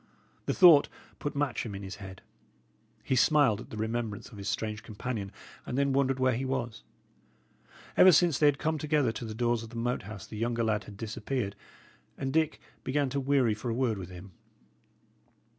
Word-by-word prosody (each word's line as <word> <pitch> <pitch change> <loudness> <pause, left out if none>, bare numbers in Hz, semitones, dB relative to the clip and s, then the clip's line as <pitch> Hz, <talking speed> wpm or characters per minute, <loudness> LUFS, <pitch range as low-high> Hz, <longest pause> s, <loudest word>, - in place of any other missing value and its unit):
The - - 0
thought 170 -6 +8 0.3
put 145 0 -4
Matcham 130 -7 -2
in 100 - -7
his 95 0 -7
head. 95 -2 -10 0.8
He 130 - 0
smiled 130 -5 +4
at - - -12
the 110 - -8
remembrance 110 -1 -3
of 110 -5 -11
his 100 0 -3
strange 105 +1 -2
companion, 105 -2 -5 0.3
and 125 - -4
then 140 -1 +2
wondered 135 -1 +1
where 130 0 +3
he 125 +3 -2
was. 120 -4 -3 1.1
Ever 185 - +8
since 165 -2 +4
they 150 - +5
had 145 -1 +3
come 160 +1 -1
together 150 -5 +1
to 115 +2 -6
the 110 -1 -6
doors 120 0 +1
of 115 - -9
the 115 - -12
Moat 120 +2 -1
House 100 0 -9
the 110 - -9
younger 115 0 0
lad 110 -2 0
had 100 - -11
disappeared, 115 0 -3 0.6
and 135 0 -3
Dick 160 -1 +1 0.2
began 140 0 0
to 140 - 0
weary 135 -4 +2
for 110 +3 -5
a 115 - -1
word 120 -5 0
with 90 -2 -7
him. 90 +2 -11
120 Hz, 195 wpm, -29 LUFS, 110-140 Hz, 1.1 s, thought